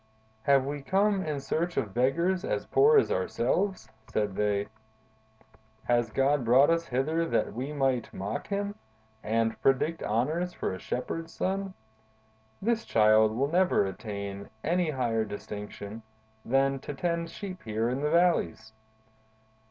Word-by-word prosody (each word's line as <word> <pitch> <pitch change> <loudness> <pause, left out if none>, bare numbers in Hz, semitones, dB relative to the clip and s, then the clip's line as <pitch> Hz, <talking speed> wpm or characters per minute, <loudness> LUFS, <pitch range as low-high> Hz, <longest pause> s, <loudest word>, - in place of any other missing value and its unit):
"'Have 135 -2 +4
we 145 +1 -4
come 195 +5 +2
in 150 -2 -2
search 170 +5 -2
of 105 -3 -1
beggars 170 - +1
as - - -2
poor 440 +2 +5
as 415 - +3
ourselves?' 195 - 0 0.2
said 105 -3 -1
they. 105 -1 +1 1.2
'Has 120 -2 +1
God 135 +4 +2
brought 130 +6 +5
us 165 0 0
hither 150 +7 0
that - - 0
we 130 +6 -4
might 135 -5 0
mock 100 +3 -4
Him, 200 0 -2 0.5
and 115 +1 0
predict 145 +5 +2
honors 155 +11 0
for - - -3
a 95 - -6
shepherd's 165 +6 -4
son? 195 0 -2 0.9
This 230 +1 +1
Child 110 0 +4
will 140 +2 +1
never 180 - +3
attain 100 0 -6
any 175 -1 +1
higher 120 -6 0
distinction 105 +1 -7 0.4
than 135 +2 +2
to 145 - -7
tend 170 +2 -1
sheep 185 -2 -7
here 110 0 -1
in 130 +3 -1
the 150 - +1
valleys. 165 - +1
135 Hz, 140 wpm, -28 LUFS, 110-170 Hz, 1.2 s, poor